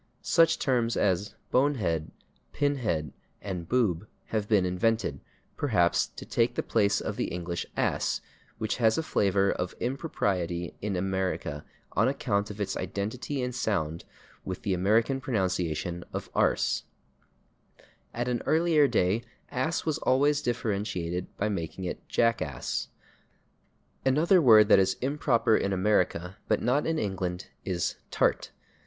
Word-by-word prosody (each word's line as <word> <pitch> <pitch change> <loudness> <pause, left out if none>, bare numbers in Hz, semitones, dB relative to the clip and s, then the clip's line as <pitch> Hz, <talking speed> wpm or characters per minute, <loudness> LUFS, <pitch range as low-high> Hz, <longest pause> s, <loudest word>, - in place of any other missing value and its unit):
Such 165 -1 +4
terms 120 -3 +1
as 100 +1 +1 0.2
/bonehead/, 110 - +1 0.5
/pinhead/ 110 - 0 0.3
and 90 -4 -5
/boob/ 105 -7 +1 0.2
have 110 -2 -1
been 105 -4 +3
invented, 90 -4 0 0.4
perhaps, 105 -11 +2
to - - -10
take - - +1
the - - -1
place 100 0 +2
of - - -4
the - - 0
English 85 -1 -4
/ass/, - - 0 0.4
which 110 -1 -2
has 110 -2 +3
a 160 - 0
flavor 100 -7 +2
of 90 0 -3
impropriety 95 - -2
in 100 -1 -2
America 95 -5 -2 0.3
on - - +2
account 100 +1 0
of 105 0 -8
its 100 - -2
identity 110 +9 -3
in 125 - -2
sound 85 -9 -1 0.4
with 95 -1 -5
the 100 - 0
American 110 +8 +2
pronunciation 90 - -1
of - - -5
/arse/. - - +2 1.3
At 120 +1 -3
an 120 -2 0
earlier 160 -2 +4
day 95 -1 +2 0.3
/ass/ 160 +7 -1
was 155 -3 0
always 145 +3 +3
differentiated 100 -7 -2
by 105 - 0
making 95 -2 -4
it 90 - -4
/jackass/. 100 - 0 1.2
Another 160 +8 +4
word 110 -6 +7
that 100 - +7
is 95 0 +2
improper 130 -4 +2
in 100 - 0
America 95 -1 +1
but - - +2
not 125 +5 +1
in 160 0 0
England 95 - -3
is 90 -2 -2
/tart - - +1
105 Hz, 135 wpm, -28 LUFS, 90-125 Hz, 1.3 s, word